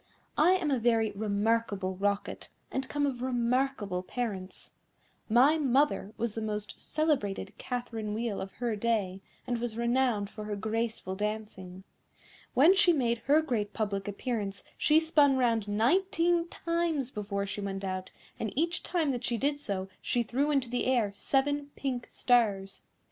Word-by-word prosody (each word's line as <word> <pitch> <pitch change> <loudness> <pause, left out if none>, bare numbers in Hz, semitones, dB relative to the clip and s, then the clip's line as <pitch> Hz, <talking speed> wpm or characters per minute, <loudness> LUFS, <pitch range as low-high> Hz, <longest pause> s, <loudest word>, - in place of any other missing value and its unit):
I 345 +4 +6
am 350 -6 +1
a 265 - +2
very 225 -2 +2
remarkable 205 -2 0
Rocket, 200 +1 -2 0.2
and 265 0 -3
come 290 0 0
of 255 -4 -2
remarkable 245 -5 0
parents. 195 -2 -5 0.6
My 265 +8 +5
mother 275 -6 +2
was 235 -2 -1
the 225 - -4
most 210 -1 -3
celebrated 295 -11 -1
Catherine 230 -4 -4
Wheel 225 -2 -2
of 195 - -7
her 240 -3 -2
day, 205 -4 0 0.2
and 240 -1 -1
was 235 -2 -3
renowned 235 -4 +1
for 215 -1 -7
her 210 -1 -3
graceful 220 -1 -2
dancing. 205 -3 -5 0.7
When 310 +8 +7
she 380 -3 +5
made 235 -6 +1
her 300 +3 +5
great 215 -8 -1
public 200 -3 -2
appearance 205 -1 -3
she 310 +1 +4
spun 295 -4 +4
round 230 -4 +2
nineteen 335 - +2
times 335 -7 -1
before 200 -2 -3
she 205 +1 -5
went 195 -1 -4
out, 185 -1 -3 0.3
and 220 - -2
each 340 +3 +1
time 330 -5 0
that 245 -2 -3
she 235 - 0
did 285 +3 0
so 195 -8 -3
she 240 - +1
threw 270 +6 0
into 275 -4 +1
the 245 +1 -1
air 240 -6 +2
seven 285 +6 0
pink 255 -3 -3
stars. 205 -6 +1
235 Hz, 155 wpm, -30 LUFS, 205-275 Hz, 0.7 s, When